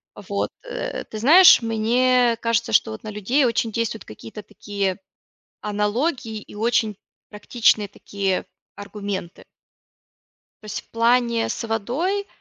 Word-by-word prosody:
вот, 200 0 -3
э. - - -5
Ты 220 - -8
знаешь, 325 - +8
мне 235 +2 +2
кажется, 230 - 0
что - - +3
вот 110 - -9
на - - -6
людей 215 +7 +1
очень 230 -1 0
действуют 225 0 -3
какие-то 115 - -10
такие 200 -2 -4 0.6
аналогии 220 +3 -2
и - - -15
очень 220 -1 0 0.3
практичные 210 0 +1
такие 195 -1 -3 0.3
аргументы. 200 -3 -6 1.2
То - - -14
есть 210 - -5
в - - -33
плане 235 0 +2
с 230 - -4
водой, 280 - -2
225 Hz, 125 wpm, -22 LUFS, 205-245 Hz, 1.2 s, знаешь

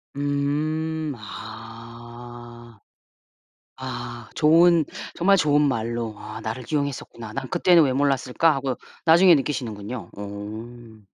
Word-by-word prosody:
음 150 +2 -1
아. 115 +2 -11 1.0
아 120 -2 -6
좋은 165 +1 +5 0.3
정말 195 +3 +4
좋은 150 -3 +3
말로 115 -4 -1
'아 110 +1 -8
나를 110 +4 -4
기용했었구나. 140 -6 -4
난 135 +2 -4
그때는 175 +6 +5
왜 135 - +1
몰랐을까?' 140 +3 +2
하고 135 -2 -2 0.3
나중에 170 +2 +7
느끼시는군요. 120 -5 -4
오. 110 +3 -8
125 Hz, 220 characters per minute, -24 LUFS, 115-150 Hz, 1.0 s, 나중에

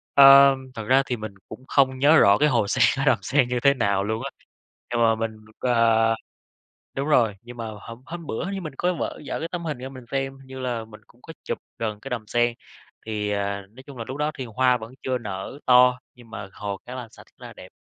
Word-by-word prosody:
Ờ, 140 0 +9 0.2
thật 110 - -5
ra 135 +3 +5
thì 125 -3 -2
mình 110 -1 -7 0.2
cũng 125 +4 -10
không 130 -2 +2
nhớ 150 +3 +6
rõ 100 +1 +6
cái 150 0 +3
hồ 115 -6 +1
sen 125 +4 +2
ở 135 - 0
Đầm - - +4
Sen 135 -3 +2
như 125 - 0
thế 140 +3 +4
nào 100 -6 0
luôn 110 +2 -2
á, - - -3 0.6
nhưng 120 0 0
mà 115 -1 +4
mình, 110 0 -4 0.2
ờ 115 -2 +3 0.8
đúng 140 +2 -2
rồi, 115 -9 +3
nhưng 120 +1 -12
mà 115 -1 -5
hôm 115 +1 -10
hôm 170 0 -8
bữa 115 - -3
hình 195 - -4
như 195 - -4
mình 155 -5 -7
có 180 +1 +1
vở 170 - -4
giở - - -3
cái 165 - -3
tấm 175 -1 -4
hình 150 -5 -3
ra 130 +1 -7
mình 130 -2 -11
xem, 135 0 -2
hình 135 0 -17
như 130 0 -9
là 120 -3 -3
mình 105 -1 -14
cũng 120 - -25
có 160 - -11
chụp - - -3 0.2
gần 105 -2 -3
cái 135 - -9
đầm 115 -4 -4
sen. 120 +1 +1 0.5
Thì, 105 -2 -3
à, 100 0 -2
nói 125 +5 -15
chung 140 -2 -10
là 115 - -4
lúc 130 +2 -5
đó 150 +1 0
thì 130 - -4
hoa 125 +2 +2
vẫn 110 +2 -10
chưa 130 -1 0
nở 105 +4 -6
to, 125 0 +6 0.2
nhưng 120 -2 -17
mà 100 -3 -8
hồ 100 -1 -5
khá 125 +1 -8
là 125 -2 -6
sạch, - - -16
rất - - -15
là - - -11
đẹp, - - -13
125 Hz, 255 wpm, -24 LUFS, 110-135 Hz, 0.8 s, Ờ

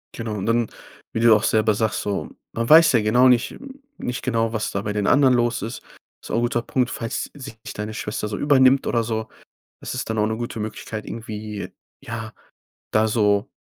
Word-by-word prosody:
Genau, 115 -2 -4
und 100 -2 -3
dann 115 0 +2 0.5
wie - - -1
du 115 - +4
ja 115 - +8
auch 105 - +3
selber 110 0 +3
sagst 110 -1 -1
so, 100 -1 -3 0.2
man 115 0 -2
weiß 160 +1 +8
ja 115 - +4
genau 120 +5 +4
nicht 125 -1 +2 0.4
nicht 125 +1 -4
genau, 115 -3 0
was 110 -2 -2
da 100 - -2
bei 105 0 -3
den 105 -1 -1
anderen 135 -3 +5
los 120 -1 +1
ist. 115 +4 -5 0.4
Ist - - -9
auch - - 0
'n - - +2
guter 120 0 0
Punkt. 125 +1 0
Falls 115 -1 -4
sich 135 -5 -9
nicht - - -8
deine 105 +1 -4
Schwester 105 0 -3
so 105 -1 -4
übernimmt 135 -2 +4
oder 115 -1 +1
so, 110 -1 -3 0.5
ist - - -5
es - - -3
dann 110 - -3
auch 105 - +3
'ne 110 0 -2
gute 120 -1 -5
Möglichkeit, 110 0 -5
irgendwie, 105 -2 -6 0.3
ja, 115 -1 -6 0.6
da 110 0 +3
so 105 0 +2
115 Hz, 215 wpm, -23 LUFS, 105-120 Hz, 0.6 s, ja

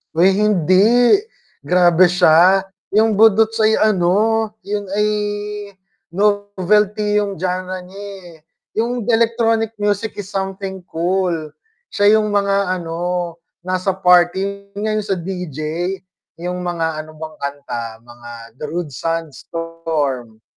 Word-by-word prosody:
Uy 190 +3 +4
hindi, 210 - +4 0.5
grabe 180 0 +4
siya, 180 +3 +5 0.2
yung 215 +1 +3
budots 220 +1 +4
ay 220 0 +3
ano, 215 +2 +2
yun 205 0 -4
ay 210 +1 +1 1.0
novelty 205 +1 +1
yung 200 -4 -1
genre 185 +1 -3
nya 180 +1 -14
eh, 190 -5 -10 0.3
yung 235 0 -1
electronic 225 -1 +2
music 205 +1 0
is 195 - -5
something 190 -1 -4
cool. 180 +2 -1 0.6
Siya 205 +2 +5
yung 215 - 0
mga 200 -2 +1
ano, 175 0 -3 0.2
nasa 185 +1 -1
party, 190 +2 +2
yun - - -5
nga 215 - 0
yung 210 - -6
sa 195 - +1
DJ, 180 -4 -6 0.8
yung 180 0 -3
mga 175 -2 -2 0.2
ano 155 - -14
bang 155 0 -8
kanta 140 -4 -5 0.2
mga 120 0 -13 0.3
Darude, 155 +1 -4
Sandstorm. 160 -5 -4
190 Hz, 115 wpm, -19 LUFS, 170-210 Hz, 1.0 s, siya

